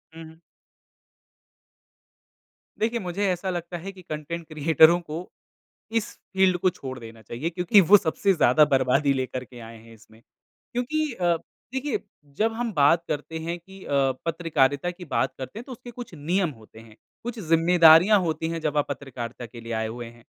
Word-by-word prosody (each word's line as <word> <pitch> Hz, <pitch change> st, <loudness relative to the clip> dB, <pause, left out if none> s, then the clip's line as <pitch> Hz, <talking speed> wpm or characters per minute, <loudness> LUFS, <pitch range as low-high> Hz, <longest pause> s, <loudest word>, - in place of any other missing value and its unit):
हुँ, 165 Hz, -, -9 dB
हुँ। 160 Hz, 0 st, -15 dB, 2.4 s
देखिए 230 Hz, +2 st, 0 dB
मुझे 190 Hz, +1 st, -2 dB
ऐसा 180 Hz, +1 st, -3 dB
लगता 175 Hz, 0 st, -4 dB
है 190 Hz, +4 st, -7 dB
कि 190 Hz, -1 st, -14 dB
कंटेंट 165 Hz, 0 st, -6 dB
क्रियेटरों 160 Hz, +2 st, +5 dB
को 170 Hz, +1 st, -7 dB, 0.7 s
इस 210 Hz, -, -8 dB, 0.2 s
फ़ील्ड 190 Hz, -1 st, +3 dB
को 185 Hz, -, +2 dB
छोड़ 135 Hz, -7 st, -8 dB
देना 115 Hz, -1 st, -11 dB
चाहिए 120 Hz, +9 st, -4 dB
क्योंकि 180 Hz, +4 st, +4 dB
वो 205 Hz, -, +11 dB
सबसे 195 Hz, +3 st, +1 dB
ज़्यादा 150 Hz, -2 st, +5 dB
बर्बादी 135 Hz, +2 st, +3 dB
लेकर 130 Hz, -1 st, -3 dB
के 125 Hz, 0 st, -13 dB
आए 115 Hz, 0 st, -10 dB
हैं 115 Hz, +1 st, -16 dB
इसमें 110 Hz, 0 st, -20 dB, 0.5 s
क्योंकि 300 Hz, +5 st, -1 dB
अ, 175 Hz, -5 st, +1 dB, 0.4 s
देखिए 265 Hz, +1 st, -1 dB, 0.4 s
जब 225 Hz, +1 st, +1 dB
हम 235 Hz, 0 st, -2 dB
बात 160 Hz, +2 st, +4 dB
करते 155 Hz, +2 st, -4 dB
हैं 170 Hz, +2 st, -4 dB
कि 190 Hz, +3 st, -14 dB
अ, -, -, -10 dB, 0.4 s
पत्रकारिता 165 Hz, -2 st, +1 dB
की 180 Hz, 0 st, -11 dB
बात 135 Hz, -3 st, 0 dB
करते 135 Hz, +11 st, -7 dB
हैं -, -, -8 dB
तो 270 Hz, -, -10 dB
उसके 245 Hz, 0 st, -9 dB
कुछ 240 Hz, -4 st, -9 dB
नियम 175 Hz, +5 st, 0 dB
होते 110 Hz, +1 st, -16 dB
हैं, 115 Hz, -1 st, -16 dB, 0.3 s
कुछ 235 Hz, -1 st, -5 dB
ज़िम्मेदारियाँ 165 Hz, +3 st, +6 dB
होती 160 Hz, -2 st, -2 dB
हैं। 165 Hz, 0 st, -4 dB
जब 150 Hz, -1 st, -1 dB
आप 145 Hz, -, +2 dB
पत्रकारिता 125 Hz, -3 st, -6 dB
के 120 Hz, 0 st, -11 dB
लिए 115 Hz, 0 st, -6 dB
आए 110 Hz, 0 st, -1 dB
हुए 120 Hz, +2 st, -6 dB
हैं 120 Hz, 0 st, -14 dB
165 Hz, 175 wpm, -25 LUFS, 130-185 Hz, 2.4 s, वो